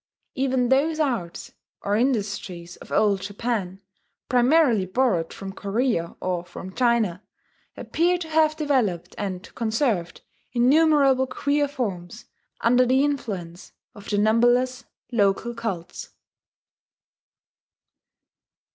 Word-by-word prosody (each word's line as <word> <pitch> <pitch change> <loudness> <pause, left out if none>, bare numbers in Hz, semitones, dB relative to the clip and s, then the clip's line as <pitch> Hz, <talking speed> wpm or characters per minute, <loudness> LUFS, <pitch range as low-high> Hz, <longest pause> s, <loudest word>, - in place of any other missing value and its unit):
Even 260 -3 0
those 305 +4 +2
arts 235 - -2 0.3
or 200 +1 0
industries 200 -7 -2
of - - -14
Old 200 -3 +2
Japan, 200 -2 -3 0.5
primarily 245 -5 +3
borrowed 185 -6 0
from 195 -1 -8
Korea 200 -4 -1
or 180 -2 -2
from 180 +2 -10
China, 230 -7 +1 0.6
appear 350 +2 +1
to 345 -2 -6
have 310 -1 +3
developed 255 - 0
and 190 -2 -5
conserved 220 - -1 0.3
innumerable 270 +1 +4
queer 285 +2 0
forms 215 -8 -5 0.4
under 245 +2 +4
the 260 +2 +3
influence 190 -12 -5 0.2
of 205 -4 -12
the 205 - 0
numberless 240 +4 +2 0.3
local 215 +1 +1
cults. 220 -8 -5
235 Hz, 100 wpm, -24 LUFS, 195-265 Hz, 0.6 s, innumerable